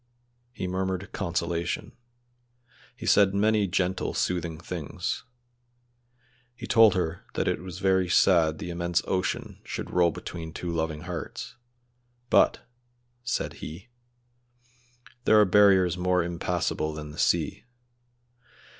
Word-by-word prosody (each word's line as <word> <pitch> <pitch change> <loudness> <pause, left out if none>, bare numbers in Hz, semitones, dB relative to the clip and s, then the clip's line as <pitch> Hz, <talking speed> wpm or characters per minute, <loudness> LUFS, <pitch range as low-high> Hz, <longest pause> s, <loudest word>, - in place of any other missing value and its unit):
He 125 - -5
murmured 95 +1 -2
consolation. 85 -2 -2 1.0
He - - -9
said 100 -1 +4
many 105 0 +3
gentle, 95 0 -1
soothing 85 -3 -1
things. 85 -3 -4 1.3
He - - -8
told 115 -5 +6
her 90 -1 -2
that - - 0
it - - 0
was 90 -1 -8
very 95 -1 +2
sad 85 -4 +4
the 85 - -5
immense 85 0 0
ocean 95 -1 -2
should - - -6
roll 90 -1 +4
between 80 0 -7
two 85 0 -4
loving 80 -2 -2
hearts, 90 0 -6 0.8
"but," - - +3 0.5
said 120 - -2
he, 90 +10 -8 1.4
"there 110 - +6
are 105 - +6
barriers 95 -2 +4
more 90 -1 +2
impassable 85 -2 -2
than 75 -1 -7
the 75 - -10
sea. - - +1
90 Hz, 120 wpm, -27 LUFS, 85-95 Hz, 1.4 s, told